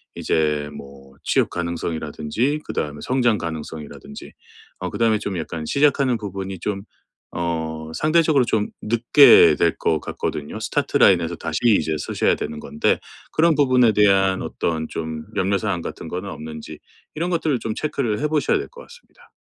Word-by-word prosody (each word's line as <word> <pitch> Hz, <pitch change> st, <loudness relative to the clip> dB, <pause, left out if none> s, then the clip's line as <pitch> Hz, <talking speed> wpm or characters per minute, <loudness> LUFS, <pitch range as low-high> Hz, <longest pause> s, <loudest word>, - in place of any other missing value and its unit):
이제 75 Hz, -2 st, 0 dB
뭐 70 Hz, -1 st, -12 dB
취업 -, -, +2 dB
가능성이라든지 85 Hz, -, -2 dB
그다음에 75 Hz, 0 st, -4 dB
성장 120 Hz, -4 st, +2 dB
가능성이라든지 80 Hz, -2 st, -7 dB, 0.5 s
어 90 Hz, -, -3 dB
그다음에 115 Hz, -2 st, +2 dB
좀 100 Hz, -3 st, -4 dB
약간 80 Hz, -1 st, -5 dB
시작하는 140 Hz, -, +2 dB
부분이 95 Hz, -3 st, -6 dB
좀 100 Hz, +1 st, -3 dB, 0.5 s
어 80 Hz, -2 st, -3 dB
상대적으로 155 Hz, -, +3 dB
좀 105 Hz, -2 st, 0 dB
늦게 120 Hz, +6 st, +6 dB
될 -, -, +2 dB
것 80 Hz, -, +1 dB
같거든요. 75 Hz, -1 st, -5 dB
start -, -, 0 dB
line에서 -, -, +4 dB
다시 -, -, -4 dB
이제 95 Hz, -9 st, +3 dB
서셔야 -, -, +1 dB
되는 75 Hz, -, -5 dB
건데 75 Hz, -, 0 dB, 0.3 s
그런 165 Hz, +1 st, +4 dB
부분에 130 Hz, -5 st, +4 dB
대한 95 Hz, -2 st, +3 dB
어떤 80 Hz, -1 st, -2 dB
좀 80 Hz, -1 st, -5 dB
염려 100 Hz, +2 st, +1 dB
사항 100 Hz, -5 st, -2 dB
같은 -, -, -7 dB
거는 90 Hz, +4 st, -5 dB
없는지 80 Hz, -2 st, -8 dB, 0.4 s
이런 170 Hz, +3 st, -2 dB
것들을 160 Hz, -7 st, 0 dB
좀 110 Hz, -, -3 dB
체크를 135 Hz, -7 st, -2 dB
해 150 Hz, -, 0 dB
보셔야 155 Hz, -, +2 dB
될 400 Hz, -, -5 dB
것 -, -, -15 dB
같습니다. 485 Hz, +1 st, -18 dB
95 Hz, 365 characters per minute, -22 LUFS, 80-130 Hz, 0.5 s, 늦게